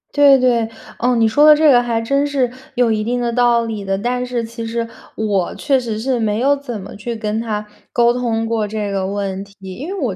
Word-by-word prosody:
对， 285 -2 +7
对， 240 -3 +2 0.3
哦， 250 +1 +2
你 225 -1 +3
说 255 +7 +3
的 305 0 +9
这 305 -1 +5
个 245 - +6
还 235 -2 -1
真 275 +5 +1
是 265 -4 0 0.2
有 245 -2 +3
一 215 -1 0
定 245 +3 -1
的 240 -1 -1
道 240 -1 +3
理 220 -3 -4
的， 195 0 -1
但 245 +4 -1
是 245 -1 -2
其 230 +1 -7
实 230 0 -3 0.3
我 205 -5 -1
确 275 -3 +1
实 230 -4 -4
是， 250 +2 -1
没 215 -1 0
有 280 +3 +3
怎 260 -6 -6
么 190 - -9
去 230 +3 -5
跟 215 -1 -2
他 210 -2 -3 0.3
沟 235 0 +3
通 230 -2 -1
过 225 -2 -1
这 210 -1 -3
个 190 -1 -1
问 195 -1 -3
题， 200 0 -18 0.2
因 280 - -7
为 390 0 -4
我 235 -9 -1
230 Hz, 255 characters per minute, -18 LUFS, 215-250 Hz, 0.3 s, 的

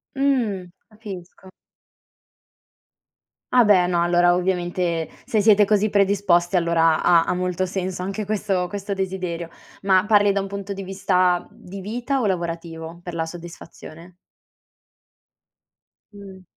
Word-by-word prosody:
Mhmm, 230 -10 0 0.2
capisco. 190 -3 -11 2.0
Ah 245 -3 +6
beh 185 -4 +5
no, 175 -1 +1
allora 175 0 +3
ovviamente 175 -2 -1 0.2
se 215 -2 +1
siete 210 -1 +5
così 210 +1 +2
predisposti 195 -3 +2
allora 165 -2 +2
ha 170 -1 +5
ha - - 0
molto 180 0 -1
senso 185 -1 -4
anche 195 +3 -3
questo 195 -3 -1
questo 200 0 -4
desiderio. 185 -3 -4 0.3
Ma 190 0 +3
parli 205 -2 +4
da 200 - 0
un 195 - -3
punto 200 0 -6
di 195 0 -5
vista 185 -2 +1
di 195 +2 -10
vita 245 +6 -2
o - - 0
lavorativo, 170 -2 -4
per 175 - -7
la 165 -1 -2
soddisfazione? 170 0 -11 2.0
Mh. 195 -2 -12
185 Hz, 125 wpm, -22 LUFS, 175-200 Hz, 2.0 s, Ah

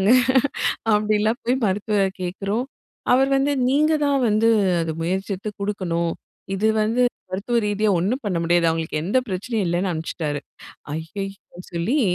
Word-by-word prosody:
ஓடிடுறாங்க. 195 +3 +3 0.8
அப்பிடிலாம் 215 +3 +2
போய் 245 +2 +2
மருத்துவர 205 +2 0 0.2
கேட்கறோம். 200 +6 -2 0.5
அவர் 265 +2 +4
வந்து, 275 +2 +2 0.2
'நீங்க 305 +4 +3
தான் 280 -2 +2
வந்து 215 +2 +3 0.3
அது 165 -1 -2
முயற்சித்து 190 +3 -2
குடுக்கணும்." 170 -5 -1 0.4
இது 210 +3 +1
வந்து 225 +4 +1 0.3
மருத்துவ 200 +6 -1
ரீதியா 210 +1 +1
ஒன்னும் 230 +10 -1
பண்ண 190 -4 0
முடியாது. 170 0 +3
அவுங்களுக்கு 160 -1 -2
எந்த 205 +8 +2
பிரச்சனையும் 205 +2 -2
இல்லன்னு 175 +2 0
அனுப்பிச்சிட்டாரு. 155 -2 -3 0.6
ஐயய்யோ! 195 +1 -8
சொல்லி 175 - +1
200 Hz, 135 wpm, -22 LUFS, 175-225 Hz, 0.8 s, அவர்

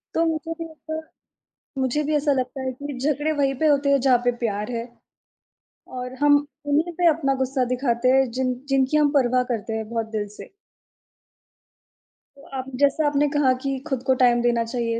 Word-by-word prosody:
तो 330 - +3
मुझे 325 0 -2
भी 330 - -5
ऐसा 315 0 -6 0.8
मुझे 265 +3 0
भी - - +1
ऐसा 290 0 +2
लगता 260 0 -2
है 260 0 -2
कि 280 0 -7
झगड़े 295 +3 0
वही 270 -1 +2
पे - - +4
होते 280 -1 +3
हैं 275 -2 +4
जहाँ 255 -2 +4
पे 245 - +3
प्यार 210 +1 -2
है 230 0 -3 1.1
और 250 +1 -5
हम 290 0 +6 0.3
उन्हीं 310 +4 +1
पे 350 - +3
अपना 275 -3 0
गुस्सा 260 0 0
दिखाते 250 -1 0
हैं 265 -2 +2
जिन 255 -1 +1
जिनकी 270 +2 +2
हम 295 -1 +4
परवाह 250 0 +2
करते 225 0 -4
हैं 220 -1 -4
बहुत 225 -1 -2
दिल 205 -1 -1
से। - - -11 1.9
तो 280 - -17
आप 260 - -4
जैसा 285 +2 +3
आपने 290 0 +2
कहा 275 -3 +4
कि 275 -1 -1
खुद 265 -4 -2
को 260 - +5
टाइम 240 -1 +4
देना 240 -1 +2
चाहिए, 230 -1 -2
270 Hz, 190 wpm, -23 LUFS, 245-290 Hz, 1.9 s, हम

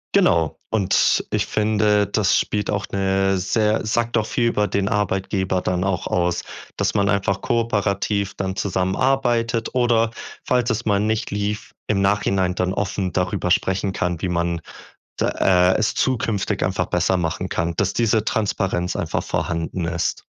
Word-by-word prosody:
Genau. 80 -3 +3
Und 100 -4 +2
ich - - 0
finde, 105 -1 +2
das 100 -2 +2
spielt 105 -1 -2
auch 100 -1 -1
'ne 95 0 +1
sehr 105 +4 +1
sagt 120 +2 0
auch 110 - +1
viel 120 +1 0
über 105 -3 +1
den 100 -1 0
Arbeitgeber 95 -3 0
dann 90 0 -1
auch 95 -3 -1
aus, 90 0 0 0.4
dass - - 0
man 100 0 +2
einfach 100 -1 0
kooperativ 100 -3 0
dann 95 -1 -3
zusammenarbeitet 115 +5 0
oder 115 -2 +2 0.3
falls 125 -1 +1
es 115 +1 -1
mal 100 -1 +2
nicht 110 +2 -1
lief, 105 +1 -3
im 100 -2 +1
Nachhinein 95 -2 +1
dann 90 0 0
offen 95 -2 -2
darüber 90 0 -1
sprechen 95 +2 +1
kann, 90 -3 -2
wie 90 - -1
man 85 -1 -1 0.6
d - - 0
äh, 90 0 +3
es 110 - +1
zukünftig 115 -6 0
einfach - - 0
besser 95 - +1
machen 90 +2 -2
kann, 85 +1 -1
dass 100 -1 +1
diese 110 -2 +2
Transparenz 95 -5 -1
einfach - - -2
vorhanden 85 +1 -2
ist. 85 0 -2
100 Hz, 155 wpm, -22 LUFS, 90-110 Hz, 0.6 s, Genau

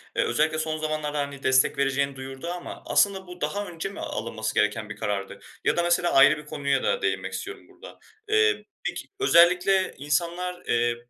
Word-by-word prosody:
eee, - - +2
özellikle 155 +5 +1
son 155 0 -2
zamanlarda, 155 -1 -2
hani, 140 -1 -4
destek 130 0 +3
vereceğini 140 0 0
duyurdu 135 +3 -8
ama 175 0 -6
aslında 195 -2 +2
bu 180 0 -11
daha 205 0 -2
önce 170 +2 -5
mi 200 - -10
alınması 110 -1 -4
gereken 105 0 +1
bir 105 - -6
karardı? 100 -1 -3 0.3
Ya - - +2
da 175 - +2
mesela, 175 0 +2
ayrı 145 +2 +7
bir 150 - -10
konuya 140 -2 -1
da 480 - 0
değinmek - - -1
istiyorum 405 +1 -6
burada. - - -14 0.3
Eee, 435 0 +3 0.2
peki - - -5
özellikle 185 - +4
insanlar, 170 +5 -2
eee, 120 0 +2
155 Hz, 180 wpm, -25 LUFS, 135-180 Hz, 0.3 s, ayrı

